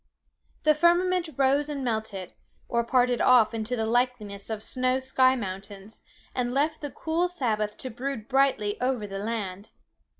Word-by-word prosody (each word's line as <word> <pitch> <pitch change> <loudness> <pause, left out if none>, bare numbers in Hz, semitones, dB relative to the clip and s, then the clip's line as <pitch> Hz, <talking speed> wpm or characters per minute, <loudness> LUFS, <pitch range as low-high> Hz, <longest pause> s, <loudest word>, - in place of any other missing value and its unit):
The 305 - +5
firmament 345 +2 +2
rose 280 +2 +2
and 285 -2 -3
melted, 220 -5 -3 0.3
or 235 0 +1
parted 245 0 +2
off 245 -3 +5
into 225 +2 -2
the 225 -2 -1
likeness 225 -4 -1
of 220 -1 -3
snowy 255 +2 0
sky 260 0 +3
mountains, 195 -1 -7 0.3
and 245 0 -1
left 305 +3 +1
the 290 - -4
cool 330 +5 -1
Sabbath 220 -11 -1
to 260 - -6
brood 245 -1 -5
brightly 270 -7 +1
over 250 -4 0
the 195 -1 -5
land. 205 -2 -4
245 Hz, 155 wpm, -27 LUFS, 215-275 Hz, 0.3 s, The